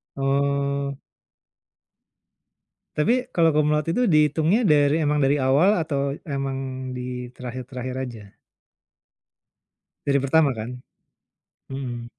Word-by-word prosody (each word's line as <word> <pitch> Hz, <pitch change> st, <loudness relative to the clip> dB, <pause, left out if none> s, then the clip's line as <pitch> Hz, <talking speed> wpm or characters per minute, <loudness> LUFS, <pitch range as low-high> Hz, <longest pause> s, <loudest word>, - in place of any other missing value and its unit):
Oh. 140 Hz, 0 st, 0 dB, 2.0 s
Tapi 245 Hz, +12 st, +2 dB
kalau 165 Hz, -1 st, +4 dB
cum 150 Hz, -1 st, +2 dB
laude 150 Hz, +2 st, 0 dB
itu 245 Hz, +9 st, +1 dB
dihitungnya 155 Hz, -, +3 dB
dari 150 Hz, +1 st, +4 dB
emang 150 Hz, 0 st, +1 dB
dari 140 Hz, 0 st, +2 dB
awal 160 Hz, +9 st, +3 dB
atau 140 Hz, -3 st, -1 dB, 0.2 s
emang 135 Hz, -1 st, -4 dB
di 125 Hz, 0 st, -5 dB
terakhir-terakhir 125 Hz, 0 st, -6 dB
aja? 110 Hz, -5 st, -11 dB, 1.7 s
Dari 140 Hz, 0 st, +3 dB
pertama 140 Hz, +1 st, +3 dB
kan? 110 Hz, 0 st, -5 dB, 1.0 s
Mhm. 125 Hz, -3 st, -5 dB
140 Hz, 100 wpm, -23 LUFS, 130-150 Hz, 2.0 s, kalau